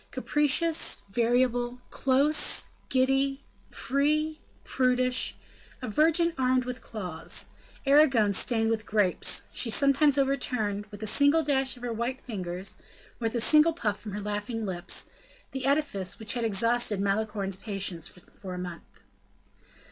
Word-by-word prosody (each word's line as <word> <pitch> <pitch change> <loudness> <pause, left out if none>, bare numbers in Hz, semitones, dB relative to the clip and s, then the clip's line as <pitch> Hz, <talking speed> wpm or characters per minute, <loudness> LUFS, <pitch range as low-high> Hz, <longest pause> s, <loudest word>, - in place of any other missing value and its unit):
Capricious, 300 +3 +2
variable, 245 +2 0
close, 275 +3 +3 0.2
giddy, 270 +1 0 0.3
free, 305 +3 -1 0.2
prudish, 255 -1 +1 0.4
a 255 - -6
virgin 330 - +2
armed 255 -1 +1
with 250 0 -6
claws, 180 -7 -4 0.4
Erigone 270 -8 +4
stained 225 +2 +2
with 220 -1 -3
grapes, 205 -4 +2
she 240 - +2
sometimes 280 +4 +3
overturned, 250 -7 0
with 205 0 -10
a - - -2
single 285 +8 +3
dash 270 -3 0
of 245 - -14
her 240 -1 -3
white 240 +4 -4
fingers, 185 -4 -5 0.4
or 235 - -4
with 225 - -2
a - - 0
single 305 +7 +5
puff 210 -10 -3
from 205 -1 -8
her 210 - -5
laughing 210 +2 -4
lips, 180 -2 -2 0.5
the 265 -1 -4
edifice 275 -11 -1
which 220 -1 -2
had 240 - -3
exhausted 225 0 +2
Malicorne's 200 -1 -2
patience 195 -5 -3
for 180 +1 -11
a - - -7
month. 180 -1 -7
240 Hz, 135 wpm, -27 LUFS, 205-275 Hz, 0.5 s, single